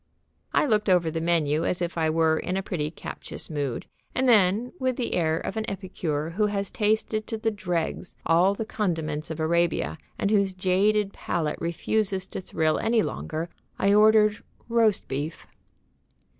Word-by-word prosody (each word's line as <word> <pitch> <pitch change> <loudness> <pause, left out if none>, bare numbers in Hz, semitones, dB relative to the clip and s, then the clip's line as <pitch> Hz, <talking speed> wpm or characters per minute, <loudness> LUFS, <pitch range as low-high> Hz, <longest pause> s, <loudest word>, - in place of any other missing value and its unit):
I - - +3
looked 215 -5 +2
over 175 -3 +3
the 165 +1 -2
menu 160 -2 +1
as 180 - 0
if 175 -1 -2
I 160 -2 +1
were 160 0 +2
in 185 +1 -2
a 195 - -2
pretty 155 -6 -2
captious 165 - -6
mood, 140 -5 -2 0.3
and 260 +1 +2
then, 215 +1 +4
with 255 -1 0
the 240 - -2
air 160 -2 +1
of 195 - -4
an 220 - -2
epicure 170 -6 -3
who 210 +4 +1
has 200 -1 -2
tasted 215 0 0
to 225 - -3
the 225 +1 0
dregs 180 -4 -3
all 180 +4 +4
the 220 - -3
condiments 160 -8 -2
of 160 0 -5
Arabia 160 - +1 0.2
and 200 - 0
whose 200 -3 +3
jaded 195 +2 +2
palate 155 -3 -2
refuses 190 +3 0
to - - -5
thrill 160 -3 0
any 225 -1 +2
longer, 160 +2 -4 0.3
I 200 +1 +3
ordered 215 0 +5 0.2
"roast 230 -3 +2
beef." 145 +4 -4
185 Hz, 170 wpm, -26 LUFS, 160-210 Hz, 0.3 s, ordered